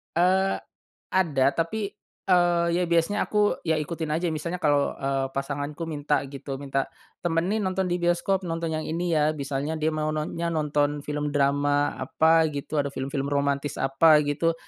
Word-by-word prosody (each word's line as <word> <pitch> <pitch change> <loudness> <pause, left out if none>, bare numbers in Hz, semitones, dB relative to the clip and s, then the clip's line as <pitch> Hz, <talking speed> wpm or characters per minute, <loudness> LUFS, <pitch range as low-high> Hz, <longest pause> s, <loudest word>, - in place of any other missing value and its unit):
Eee, 190 +3 +3 0.5
ada 155 -8 +2
tapi, 195 +5 -1 0.4
eee, 175 -2 +4
ya 180 - +2
biasanya 170 +4 +1
aku 210 -1 +2
ya 160 -1 +2
ikutin 160 0 -4
aja 170 +3 0
misalnya 170 +3 -3
kalau, 145 -3 +2
eee, 135 0 -1
pasanganku 145 +4 -4
minta 145 -1 0
gitu, 135 0 -6
minta, 135 -1 -1 0.4
"Temenin 175 +5 0
nonton 185 0 0
di 175 - +1
bioskop 175 +2 +1
nonton 165 -1 -2
yang 155 0 -2
ini 170 +1 -1
ya," 150 0 +3
misalnya 140 +1 -3
dia 155 +1 +1
mau 155 -1 -1
non 155 0 -3
nya 170 0 -1
nonton 150 -1 0
film 150 0 -2
drama 145 0 +2
apa 160 +5 +3
gitu, 145 +1 -4
ada 140 - -3
film-film 135 +1 -3
romantis 140 0 0
apa 150 +4 +5
gitu. 155 +3 +1
155 Hz, 165 wpm, -26 LUFS, 145-170 Hz, 0.5 s, apa